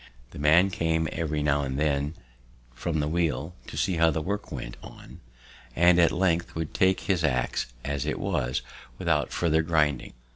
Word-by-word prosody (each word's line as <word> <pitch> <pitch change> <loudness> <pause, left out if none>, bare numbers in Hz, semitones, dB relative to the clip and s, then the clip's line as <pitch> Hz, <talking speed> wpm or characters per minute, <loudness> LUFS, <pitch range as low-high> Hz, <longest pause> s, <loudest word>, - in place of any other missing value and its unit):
The - - -10
man 80 +6 +5
came 80 -2 0
every 75 -2 -2
now 75 -1 +2
and 65 -1 -3
then 75 +1 0 0.6
from 80 +4 -2
the 75 - -1
wheel 80 -1 -1
to - - -8
see 90 - 0
how 80 0 +5
the 80 0 -1
work 100 +6 -4
went - - -6
on, - - -12 0.6
and 85 +1 +5
at 85 - +5
length 90 -1 0
would 80 -2 -4
take 95 -2 +2
his 90 -4 0
ax 65 -3 0
as 70 -1 -2
it - - -2
was, 75 -10 -1 0.3
without 75 -7 0
farther 80 -2 +2
grinding. 75 -4 0
80 Hz, 175 wpm, -27 LUFS, 75-85 Hz, 0.6 s, man